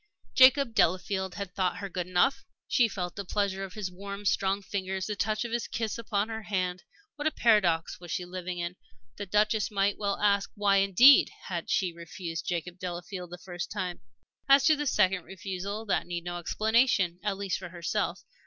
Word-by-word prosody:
Jacob 260 -1 +6
Delafield 190 0 +1
had 200 -3 -6
thought 185 -1 0
her 200 - -5
good 180 -2 -4
enough! 185 +9 +2 0.2
She 240 - +4
still 195 -4 -4
felt 175 - -5
the 200 - -4
pressure 195 0 -1
of 190 - -7
his 200 -4 -4
warm, 200 +2 -8
strong 195 +1 +1
fingers, 190 -1 -3
the 210 - -3
touch 215 +2 -1
of 235 - -5
his 235 0 -2
kiss 225 0 -3
upon 210 -2 -1
her 225 0 -5
hand. 185 -3 -2 0.4
What 295 +1 -1
a - - +2
paradox 190 - +2
was 175 -1 -11
she 180 - -2
living 180 0 -5
in! 175 +1 -4 0.4
The 205 - -5
Duchess 210 +2 +2
might 200 -1 0
well 200 -1 -1
ask: 200 -1 +2
why, 205 -2 +3
indeed, 195 +8 +7 0.2
had - - -4
she 185 -4 +1
refused 170 -1 -6
Jacob 175 0 -3
Delafield 180 0 -6
that 180 0 -10
first 175 -2 -5
time? 180 -1 -4 0.5
As 275 0 +7
to 310 - +6
the 295 0 -3
second 190 -6 +2
refusal, 195 +3 -5
that 200 - 0
needed 175 -1 -4
no 175 0 -4
explanation, 215 -2 +2
at 205 -2 -2
least 195 -2 -2
for 180 -2 -8
herself. 175 +1 -2
195 Hz, 195 wpm, -29 LUFS, 180-210 Hz, 0.5 s, indeed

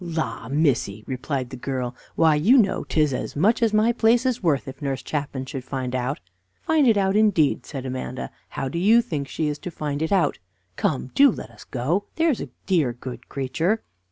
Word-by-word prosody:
"La, 160 -9 -3
missy!" 130 -8 +1
replied 130 -1 -3
the - - -5
girl, 125 -1 -3 0.2
"why, 160 -1 +5
you 185 - +5
know 200 -6 +3
'tis 150 -3 +1
as - - -4
much 210 - +3
as 230 -2 +3
my 215 +2 +4
place 235 +1 +3
is 250 -1 0
worth 145 - +1
if 135 - -9
Nurse 135 -2 -2
Chapman 140 -3 -3
should 130 -1 -6
find 130 -1 -4
out." 130 +2 -1 0.4
"Find 310 -4 +3
it 225 -3 +5
out 195 0 +2
indeed," 205 -9 +3
said 135 -3 -6
Amanda; 130 0 -5 0.2
"how 135 - -3
do 170 +6 -3
you 225 +6 +5
think 145 -8 -3
she 155 +2 -2
is 145 -1 -3
to - - -6
find 150 -3 -4
it 160 - -1
out? 180 -7 +2 0.4
Come, 130 +1 -1
do 280 0 +7
let - - -6
us - - -14
go, 150 +11 -1
there's 325 -6 +2
a - - -6 0.2
dear, 160 -10 +2
good 120 0 -9
creature." 160 - -1
150 Hz, 205 wpm, -24 LUFS, 130-200 Hz, 0.4 s, do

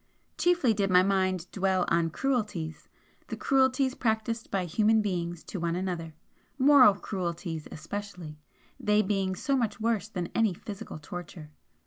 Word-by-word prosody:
Chiefly 345 -10 +3
did 200 -2 0
my 180 0 +6
mind 185 -2 +1
dwell 190 -2 +1
on 165 -1 +2
cruelties 205 - -2 0.4
the - - -5
cruelties 265 0 +2
practised 225 -1 -1
by 195 -2 -1
human 215 +6 +3
beings 175 -4 -3
to 190 - -6
one 170 0 -1
another, 175 -4 -4 0.4
moral 265 -6 +7
cruelties 170 -5 -4
especially, 170 -2 -7 0.4
they 210 0 +3
being 190 -2 0
so 275 +9 0
much 235 -5 -1
worse 220 -3 0
than 180 -5 -4
any 220 -5 +2
physical 200 -1 -8
torture. 155 0 -9
195 Hz, 140 wpm, -28 LUFS, 175-220 Hz, 0.4 s, moral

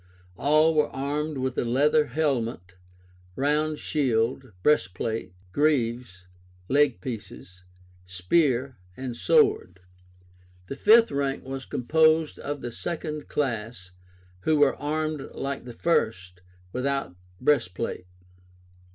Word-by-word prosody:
All 155 - +3
were 150 -1 +2
armed 145 +2 -3
with 130 -1 -2
a - - +1
leather 145 +5 +3
helmet, 120 - -2 0.6
round 150 +2 0
shield, 130 -4 0
breastplate, 110 -5 0 0.2
greaves 120 -9 0 0.4
(leg 140 0 +2
pieces), 100 -6 -8 0.4
spear, 125 - +1 0.2
and 130 -2 -5
sword. 435 - +2 0.9
The - - -4
fifth 225 +9 +5
rank 140 -1 -1
was 135 0 -6
composed 155 +4 +2
of 145 -1 -5
the 120 - -5
second 155 +1 -5
class, 115 -8 -3 0.5
who 155 +11 +1
were 145 -2 +4
armed 155 0 -3
like 135 -2 -4
the 125 - -7
first, 95 - -1 0.3
without 135 -7 -2 0.2
breastplate. 90 -8 0
135 Hz, 105 wpm, -26 LUFS, 115-150 Hz, 0.9 s, fifth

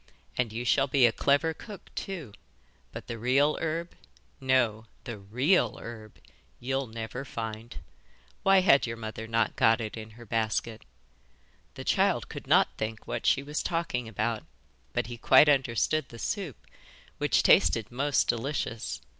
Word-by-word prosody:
And 125 -3 0
you 120 +3 -4
shall 135 +3 +3
be 130 -2 +4
a 120 - +5
clever 145 +6 +2
cook 205 +4 -12
too, 165 - -6 0.6
but - - -8
the 115 -1 -6
real 135 +6 +3
herb 165 +2 -2 0.5
no, 120 -5 +1 0.2
the 115 -4 -7
REAL 125 - +1
herb 110 -2 -10 0.4
you'll 135 +1 -2
never 115 +3 -6
find. 115 -3 -6 0.7
Why 195 -1 +5
had 140 -9 +5
your 115 0 -5
mother 110 0 -6
not 115 0 0
got 110 +1 +4
it 110 -2 -5
in 110 -1 -8
her 120 - -11
basket?' 110 0 -2 0.9
The - - -7
child - - +1
could - - -8
not - - +4
think 110 0 -4
what - - -3
she 140 - +3
was 150 +2 -3
talking 165 -9 -2
about, 110 +1 -2 0.5
but - - -1
he 120 +1 -7
quite 130 +5 +6
understood 135 +2 +2
the 115 - -11
soup, 175 - -3 0.6
which - - +2
tasted 90 +8 +4
most 140 +3 +1
delicious. 120 -1 -2
120 Hz, 155 wpm, -28 LUFS, 110-140 Hz, 0.9 s, quite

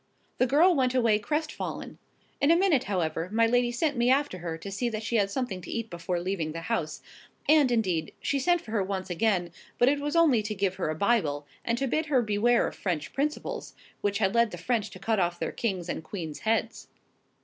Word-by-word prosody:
The 255 - +4
girl 320 +8 +5
went 260 -4 +1
away 230 -4 +3
crestfallen: 300 +8 -4 0.4
in 280 - +4
a 335 - +7
minute, 345 -7 +3
however, 170 -3 -1
my 230 +1 +4
lady 245 +1 +2
sent 285 +3 0
me 240 +1 +3
after 275 -7 +2
her 165 -1 -4
to 195 +4 -8
see 240 +5 -1
that 220 -1 -4
she 230 +2 0
had 200 -2 +2
something 200 -5 -3
to - - -10
eat 230 -1 -4
before 175 +1 -2
leaving 170 -3 -2
the 165 - -5
house; 165 -5 -3 0.4
and, 295 -4 +5
indeed, 185 -9 0
she 280 - 0
sent 350 +5 +2
for 215 - -11
her 220 -3 +1
once 190 -1 -4
again, 180 -2 +1 0.3
but 245 - +5
it 285 +1 +1
was 295 +2 -2
only 305 -9 +5
to 210 0 -4
give 190 -1 -1
her 180 - -1
a 155 - -2
Bible, 160 -8 +1 0.2
and 235 0 0
to 275 - 0
bid 310 +4 0
her 265 -5 +3
beware 220 +3 +2
of - - -4
French 170 -6 -3
principles, 300 - -3 0.3
which 205 0 0
had 195 -3 +1
led 235 -1 +4
the 175 - -7
French 220 +2 -1
to - - -11
cut 215 +3 0
off 175 -1 0
their - - -3
king's 190 -7 -2
and 160 - -4
queen's 160 -3 -6
heads. 225 0 -1
220 Hz, 225 wpm, -28 LUFS, 185-255 Hz, 0.4 s, a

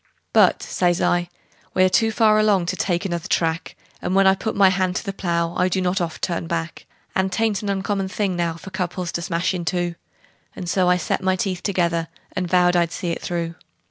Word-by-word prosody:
"But," - - +4
says 175 -1 +1
I, 175 0 +1 0.5
"we're 185 0 +5
too 225 +4 +3
far 215 -1 +4
along 205 -4 +3
to 170 - -2
take 180 0 -1
another 175 -1 -3
track, 165 -1 -1 0.3
And 180 - -1
when 195 0 +5
I 190 - +7
put 220 +3 -3
my 195 -1 +6
hand 185 -1 0
to - - -2
the 195 -3 -4
plow 170 -3 -1
I 180 - +2
do 190 - 0
not 185 +1 0
oft 165 -2 -4
turn 170 -2 -1
back; 165 0 -4 0.3
And 190 0 +1
'tain't 220 0 0
an 205 - -3
uncommon 195 0 -1
thing 190 0 -1
now 170 -1 -1
for 190 +3 -10
couples 180 -1 -3
to 170 - -3
smash 170 +2 -1
in 180 -2 -3
two;" 175 0 -1 0.6
And 180 - -6
so 180 0 +2
I 180 - +4
set 180 - -1
my 190 0 +2
teeth 185 -1 -2
together, 170 -4 0 0.3
and 180 -1 -1
vowed 180 0 +4
I'd 170 -1 +2
see 175 0 -3
it - - -4
through. 170 -1 -3
180 Hz, 220 wpm, -22 LUFS, 170-190 Hz, 0.6 s, I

